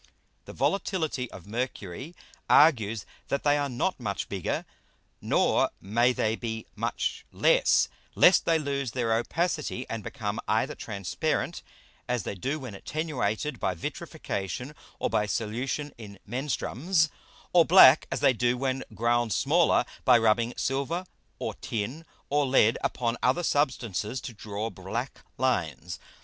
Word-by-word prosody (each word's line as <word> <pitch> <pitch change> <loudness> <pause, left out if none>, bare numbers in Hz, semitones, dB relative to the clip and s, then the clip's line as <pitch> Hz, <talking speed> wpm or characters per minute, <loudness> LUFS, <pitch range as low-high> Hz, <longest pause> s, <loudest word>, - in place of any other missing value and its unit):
The - - -9
Volatility 160 - -1
of 95 - -11
Mercury 120 - -5 0.3
argues 115 -9 +4 0.2
that 140 - -1
they 145 0 +4
are 145 -1 0
not 135 +9 -1
much 105 -5 -3
bigger, 95 -4 -2 0.6
nor - - +2
may 120 +5 +2
they 110 -3 0
be 110 -1 -5
much - - -2
less, - - +4 0.3
lest 180 - +6
they 165 -1 +4
lose 140 -5 -2
their 115 -3 +1
Opacity, 150 +1 -1
and 115 -2 -5
become 105 +1 -4
either 115 +7 +1
transparent 110 - -2 0.5
as 125 -4 0
they - - -4
do 135 - -3
when 125 -6 -7
attenuated 130 0 -2
by 90 - -1
Vitrification, 100 - -5 0.2
or - - 0
by 105 - +1
Solution 125 +7 -2
in 100 -3 -10
Menstruums, 150 - 0 0.4
or 175 -1 +7
black 160 -5 +8
as 135 - -2
they 130 - +5
do 120 +1 +1
when 130 0 -1
ground 120 0 +1
smaller, 155 -1 +3 0.2
by 125 -2 +7
rubbing 115 +1 +2
Silver, 140 +7 -1 0.3
or - - -3
Tin, 120 +9 -4 0.2
or 145 0 +1
Lead, 115 -4 +4
upon 120 -1 -1
other 130 +8 +2
Substances 125 - 0
to 120 - -7
draw 105 +1 -5
black 110 +7 -5 0.2
Lines. 90 - -1
125 Hz, 135 wpm, -28 LUFS, 110-145 Hz, 0.6 s, black